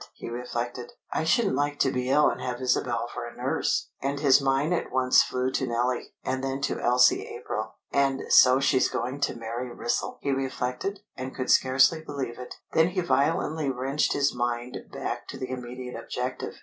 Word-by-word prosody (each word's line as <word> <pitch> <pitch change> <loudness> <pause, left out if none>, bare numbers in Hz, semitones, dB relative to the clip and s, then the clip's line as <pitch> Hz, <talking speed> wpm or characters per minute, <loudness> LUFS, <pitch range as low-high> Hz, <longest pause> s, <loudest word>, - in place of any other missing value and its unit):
he - - -8
reflected. 120 0 -4 0.2
"I - - 0
shouldn't 200 +5 +2
like 145 +1 0
to 135 - +3
be 125 0 -2
ill 150 +3 +5
and - - -1
have 125 -1 -3
Isabel 130 -1 0
for - - -5
a - - -12
nurse!" - - -1
And 140 +1 -1
his 140 -1 +5
mind 135 +5 +1
at 175 - -2
once 130 0 +5
flew 125 +1 -1
to 130 - -1
Nellie, 120 +1 -1
and 130 0 -2
then 135 0 -2
to - - -1
Elsie 125 0 +4
April. 110 -3 -5 0.2
"And 135 -1 +1
so 130 +1 +7
she's 135 -1 +3
going 125 +4 -3
to - - 0
marry 120 +2 -5
Wrissell!" 120 0 -2
he 140 - -1
reflected, 135 +8 -2
and 130 0 -6
could 130 - -1
scarcely 130 +5 +4
believe 135 -6 -5
it. 125 - -8 0.2
Then 160 +1 +5
he 180 +1 -1
violently 155 -2 +1
wrenched 135 +3 0
his 140 0 +1
mind 120 0 -2 0.2
back - - -4
to - - -7
the 130 0 -5
immediate 125 0 -6
objective. 125 +1 -4
130 Hz, 190 wpm, -27 LUFS, 125-140 Hz, 0.2 s, so